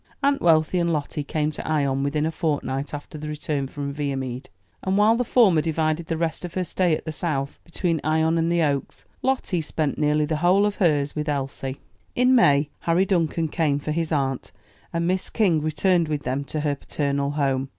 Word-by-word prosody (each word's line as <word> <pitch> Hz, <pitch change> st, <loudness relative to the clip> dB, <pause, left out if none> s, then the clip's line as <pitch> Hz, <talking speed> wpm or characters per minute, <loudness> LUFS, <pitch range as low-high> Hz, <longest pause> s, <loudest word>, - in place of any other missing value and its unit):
Aunt 280 Hz, 0 st, +2 dB
Wealthy 165 Hz, +1 st, +3 dB
and 170 Hz, -1 st, +1 dB
Lottie 150 Hz, -1 st, -2 dB
came 150 Hz, +1 st, -1 dB
to -, -, -7 dB
Ion 140 Hz, -3 st, +1 dB
within 150 Hz, +2 st, 0 dB
a 160 Hz, -, 0 dB
fortnight 145 Hz, -4 st, -2 dB
after 145 Hz, +1 st, -7 dB
the 150 Hz, -, -6 dB
return 150 Hz, -2 st, -2 dB
from 140 Hz, +1 st, -5 dB
Viamede; 135 Hz, -3 st, -4 dB, 0.3 s
and 190 Hz, +1 st, 0 dB
while 215 Hz, +2 st, +5 dB
the 245 Hz, -, +1 dB
former 210 Hz, -9 st, +4 dB
divided 160 Hz, +1 st, -1 dB
the 165 Hz, -, -1 dB
rest 165 Hz, 0 st, -2 dB
of 175 Hz, -2 st, -7 dB
her 185 Hz, -, 0 dB
stay 180 Hz, -2 st, +1 dB
at -, -, -13 dB
the 160 Hz, -, -3 dB
South 140 Hz, -4 st, -3 dB
between 170 Hz, -2 st, -1 dB
Ion 160 Hz, +2 st, +2 dB
and 165 Hz, +1 st, +1 dB
the 170 Hz, -1 st, +2 dB
Oaks, 140 Hz, -3 st, -2 dB, 0.2 s
Lottie 255 Hz, -10 st, 0 dB
spent 155 Hz, -2 st, -2 dB
nearly 150 Hz, 0 st, +2 dB
the 155 Hz, +1 st, -1 dB
whole 180 Hz, +5 st, +4 dB
of 205 Hz, -1 st, -1 dB
hers 150 Hz, -6 st, +1 dB
with 150 Hz, 0 st, -2 dB
Elsie. 135 Hz, -1 st, -3 dB, 0.4 s
In 250 Hz, +1 st, +4 dB
May, 145 Hz, -, +4 dB
Harry 170 Hz, +3 st, +2 dB
Duncan 165 Hz, -3 st, +1 dB
came 150 Hz, -2 st, +1 dB
for 145 Hz, +1 st, -4 dB
his 165 Hz, +1 st, -1 dB
aunt, 135 Hz, -4 st, -1 dB, 0.4 s
and 170 Hz, 0 st, -1 dB
Miss 185 Hz, +1 st, 0 dB
King 180 Hz, -9 st, +2 dB
returned 170 Hz, +2 st, +2 dB
with 150 Hz, -2 st, -2 dB
them 130 Hz, +3 st, -2 dB
to 155 Hz, +1 st, -3 dB
her 145 Hz, -1 st, +1 dB
paternal 140 Hz, 0 st, -2 dB
home. 135 Hz, -2 st, 0 dB
155 Hz, 200 wpm, -24 LUFS, 145-170 Hz, 0.4 s, while